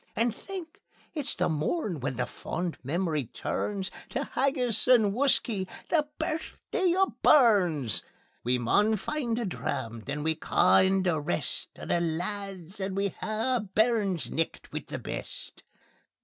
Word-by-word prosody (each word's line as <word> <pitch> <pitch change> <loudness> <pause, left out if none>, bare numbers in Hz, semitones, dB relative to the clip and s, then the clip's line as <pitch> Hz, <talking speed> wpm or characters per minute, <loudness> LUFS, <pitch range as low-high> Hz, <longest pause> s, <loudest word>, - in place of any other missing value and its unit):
And 230 -1 +1
think! 365 -2 -8 0.3
it's 290 -3 -1
the - - +1
morn 170 - -1
when 130 -1 -3
fond 175 0 -4
memory 155 0 0
turns 195 - -3 0.2
Tae 275 - -2
haggis 255 -5 +2
and 225 -6 +5
whuskey 230 -6 +3 0.2
the 300 -3 +3
Birthday 345 +3 -1
o' 385 0 +3
Burns. 185 - +4 0.4
We 125 +1 +2
maun 205 - +3
find 235 +1 -2
a 240 - -1
dram; 115 - -3
then 145 +1 -3
we'll 160 0 +1
ca' - - +4
in 190 0 +3
the 175 -4 +1
rest 85 -12 -2
O' - - -8
the 170 - +1
lads, 185 +2 -3
and 190 0 -2
we'll 200 -1 +1
hae 225 +7 -1
a - - -1
Burns' 210 -3 +1
Nicht 165 0 -2
wi' - - -3
the - - -4
best." - - -7
200 Hz, 150 wpm, -28 LUFS, 165-245 Hz, 0.4 s, and